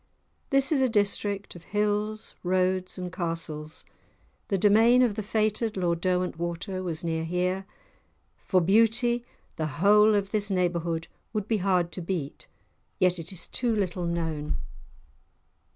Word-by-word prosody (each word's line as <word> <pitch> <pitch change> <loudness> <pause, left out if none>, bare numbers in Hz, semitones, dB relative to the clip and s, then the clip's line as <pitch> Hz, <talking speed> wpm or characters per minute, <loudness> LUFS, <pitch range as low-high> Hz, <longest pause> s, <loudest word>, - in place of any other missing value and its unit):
This 275 0 +3
is 285 -4 +3
a 260 - +3
district 205 -2 0
of 170 - -11
hills, 210 +1 -1
roads, 185 +1 0
and 180 -1 -5
castles; 165 -3 -4 0.6
the 195 - +1
domain 225 +6 +5
of 235 -4 +2
the 215 - -3
fated 215 +1 0
Lord 170 -2 0
Derwentwater 180 +1 -2
was 175 -2 -3
near 160 -1 -1
here. 180 +3 -1 0.7
For 185 -2 +1
beauty 230 +5 +3 0.3
the 155 - -1
whole 210 +4 +6
of 200 -1 -1
this 210 -1 0
neighbourhood 170 -3 -1 0.3
would 210 -2 -2
be 220 - +1
hard 180 -3 +1
to 185 - -5
beat; 165 -5 -4 0.5
yet 180 -1 +2
it 165 +2 -5
is 180 -2 -5
too 235 -3 -1
little 180 -4 -1
known. 160 -3 -2
185 Hz, 140 wpm, -27 LUFS, 170-210 Hz, 0.7 s, whole